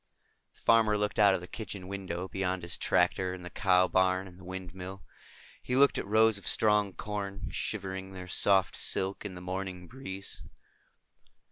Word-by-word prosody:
The -, -, -24 dB
farmer 110 Hz, -2 st, +4 dB
looked 105 Hz, +1 st, -1 dB
out 100 Hz, -2 st, +6 dB
of 90 Hz, -, -4 dB
the 90 Hz, -, -9 dB
kitchen 100 Hz, -3 st, -7 dB
window, 95 Hz, -2 st, -4 dB
beyond 95 Hz, -1 st, -2 dB
his 85 Hz, 0 st, -2 dB
tractor 90 Hz, +1 st, +1 dB
and 90 Hz, -1 st, -10 dB
the 90 Hz, -, -7 dB
cow 90 Hz, -2 st, +4 dB
barn 95 Hz, +1 st, +2 dB
and 90 Hz, 0 st, -14 dB
the -, -, -14 dB
windmill. 95 Hz, 0 st, -7 dB, 0.6 s
He 125 Hz, -, -2 dB
looked 140 Hz, +1 st, +5 dB
at -, -, -5 dB
rows 110 Hz, 0 st, +4 dB
of 95 Hz, -, -10 dB
strong 105 Hz, -3 st, +3 dB
corn, 100 Hz, -1 st, -4 dB
shivering 95 Hz, -2 st, -4 dB
their 90 Hz, -1 st, -8 dB
soft 95 Hz, 0 st, +3 dB
silk 95 Hz, +2 st, -1 dB
in 95 Hz, -3 st, -5 dB
the 90 Hz, -, -8 dB
morning 90 Hz, -1 st, -5 dB
breeze. 95 Hz, -6 st, -6 dB
95 Hz, 170 wpm, -30 LUFS, 90-100 Hz, 0.6 s, out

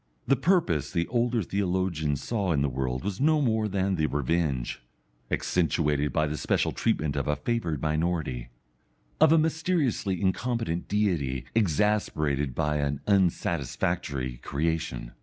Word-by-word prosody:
The 135 Hz, -, +4 dB
purpose 135 Hz, -, +2 dB
the 85 Hz, -, 0 dB
older 120 Hz, -2 st, +1 dB
theologians 90 Hz, -7 st, -1 dB
saw 100 Hz, -7 st, 0 dB
in 70 Hz, -2 st, +1 dB
the 70 Hz, -, +1 dB
world 65 Hz, -1 st, -2 dB
was 100 Hz, +3 st, -3 dB
no 155 Hz, +1 st, +4 dB
more 110 Hz, -6 st, +1 dB
than 95 Hz, -1 st, 0 dB
the 80 Hz, -1 st, +2 dB
revenge 70 Hz, -4 st, -1 dB, 0.5 s
accentuated 75 Hz, -4 st, +1 dB
by 75 Hz, -, +1 dB
the 75 Hz, 0 st, -3 dB
special -, -, +1 dB
treatment 75 Hz, -2 st, 0 dB
of 70 Hz, -, -1 dB
a 75 Hz, -, +2 dB
favoured 85 Hz, 0 st, -2 dB
minority 80 Hz, -6 st, -1 dB, 0.7 s
of -, -, +6 dB
a 165 Hz, -, +6 dB
mysteriously 155 Hz, -, 0 dB
incompetent 100 Hz, -2 st, -1 dB
Deity 85 Hz, -12 st, 0 dB
exasperated 75 Hz, -, +1 dB
by 75 Hz, -1 st, 0 dB
an 70 Hz, -1 st, -1 dB
unsatisfactory 70 Hz, -8 st, 0 dB
creation. 70 Hz, -4 st, -2 dB
85 Hz, 135 wpm, -27 LUFS, 70-105 Hz, 0.7 s, of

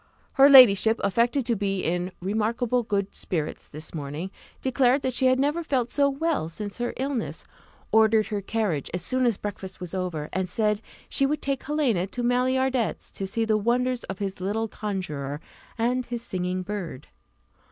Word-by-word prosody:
Her 275 Hz, +1 st, +7 dB
ladyship 225 Hz, -5 st, +8 dB
affected 235 Hz, +6 st, +2 dB
to 235 Hz, -, +1 dB
be 195 Hz, -2 st, -1 dB
in 180 Hz, +2 st, -1 dB
"remarkable 220 Hz, +5 st, 0 dB
good 200 Hz, -3 st, -2 dB
spirits 155 Hz, -4 st, -3 dB
this 155 Hz, +1 st, -7 dB
morning," 155 Hz, +4 st, -5 dB, 0.3 s
declared 260 Hz, +1 st, +2 dB
that 260 Hz, -, 0 dB
she 260 Hz, +1 st, +2 dB
had 255 Hz, 0 st, +4 dB
never 295 Hz, +5 st, +1 dB
felt 255 Hz, -6 st, 0 dB
so 280 Hz, -1 st, +3 dB
well 285 Hz, -, -1 dB
since 205 Hz, +5 st, -7 dB
her 240 Hz, -, -2 dB
illness, 265 Hz, -3 st, -3 dB, 0.5 s
ordered 220 Hz, 0 st, +5 dB
her 205 Hz, -2 st, -2 dB
carriage 195 Hz, -8 st, -1 dB
as 180 Hz, -, -4 dB
soon 255 Hz, +5 st, +1 dB
as 225 Hz, -5 st, +1 dB
breakfast 195 Hz, -2 st, -6 dB
was 180 Hz, -2 st, -6 dB
over, 180 Hz, -5 st, -3 dB
and 185 Hz, 0 st, -1 dB
said 210 Hz, +1 st, +1 dB, 0.3 s
she 275 Hz, -, +2 dB
would 300 Hz, +2 st, -2 dB
take 275 Hz, -1 st, -1 dB
Helena 265 Hz, -, 0 dB
to 245 Hz, +5 st, -5 dB
Maillardet's, 255 Hz, 0 st, +1 dB
to 195 Hz, -, -4 dB
see 225 Hz, +4 st, -1 dB
the 215 Hz, -1 st, +2 dB
wonders 245 Hz, +3 st, 0 dB
of 195 Hz, -, -6 dB
his 195 Hz, -2 st, -4 dB
little 215 Hz, +4 st, -1 dB
conjuror 155 Hz, -10 st, -4 dB, 0.4 s
and 245 Hz, +2 st, +1 dB
his 240 Hz, -1 st, -4 dB
singing 185 Hz, -3 st, -2 dB
bird. 185 Hz, -9 st, -6 dB
220 Hz, 175 wpm, -26 LUFS, 190-250 Hz, 0.5 s, ladyship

